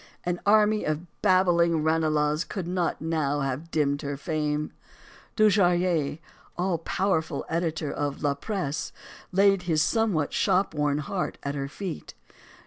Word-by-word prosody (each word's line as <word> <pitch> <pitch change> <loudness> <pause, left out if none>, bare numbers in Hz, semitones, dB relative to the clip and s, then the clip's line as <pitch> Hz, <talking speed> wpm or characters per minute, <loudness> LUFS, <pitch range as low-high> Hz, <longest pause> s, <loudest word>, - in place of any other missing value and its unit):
An 175 0 -1
army 215 0 +4
of 155 +3 -2 0.2
babbling 175 -4 +3
Ranelaghs 155 -1 +1
could 190 -5 -5
not 175 -3 -1
now 150 -3 0
have 135 +4 -3
dimmed 145 -3 0
her 145 -2 -4
fame. 150 -1 -2 0.6
Dujarrier, 180 -8 +3 0.4
all 180 -1 0
powerful 170 -1 -1
editor 165 -2 -2
of 145 0 -3
"La 145 -1 +2
Presse," 160 -1 -3 0.4
laid 195 0 +4
his 155 -1 +3
somewhat 190 -5 +1
shopworn 150 -6 +1
heart 180 +5 -3
at 140 - -2
her 140 -1 -3
feet. 180 +3 -7
165 Hz, 130 wpm, -26 LUFS, 150-185 Hz, 0.6 s, army